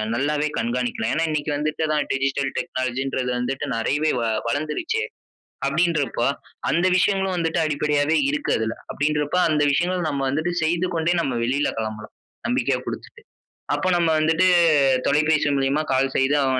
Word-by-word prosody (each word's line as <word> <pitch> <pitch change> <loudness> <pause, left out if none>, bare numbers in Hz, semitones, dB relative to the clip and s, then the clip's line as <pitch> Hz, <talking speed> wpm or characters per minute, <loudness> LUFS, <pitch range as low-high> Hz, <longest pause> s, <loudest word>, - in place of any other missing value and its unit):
நல்லாவே 145 +4 0
கண்காணிக்கலா. 235 0 -1
ஏன்னா, 165 +1 +1
இன்னைக்கு 150 0 -2
வந்துட்டு 155 +1 -1
தான் 150 - +1
டிஜிட்டல் 135 0 -1
டெக்னாலஜி 130 0 -2
என்றது 130 -2 -2
வந்துட்டு 135 +3 -2
நிறையவே 145 +7 +1
வ - - -1 0.2
வளர்ந்துடுச்சே. 155 - -1 0.6
அப்படின்றப்போ, 155 -5 +1 0.4
அந்த 170 +3 +2
விஷயங்களும் 190 0 +1
வந்துட்டு 165 0 0
அடிப்படையாவே 150 0 +1
இருக்கு 150 +1 -2
அதுல. 110 0 -2 0.2
அப்படின்றப்போ, 150 +2 0
அந்த 150 -1 +1
விஷயங்கள 180 +5 +1
நம்ம 140 -1 -2
வந்துட்டு 155 +5 -1
செய்துக்கொண்டே 170 0 0
நாம 130 -6 -2
வெளியில 135 +5 +1
கெளம்பலாம். 110 -1 -5 0.3
நம்பிக்கையா 245 +3 0
குடுத்துட்டு. 485 - -7 0.5
அப்ப - - -2
நம்ம 170 -1 +2
வந்துட்டு, 160 +4 +3 0.6
தொலைபேசி 155 0 +2
மூலியமா 135 +3 +1
கால் 135 +1 +2
செய்து 135 +2 +2
அ - - +2
150 Hz, 140 wpm, -23 LUFS, 135-170 Hz, 0.6 s, வந்துட்டு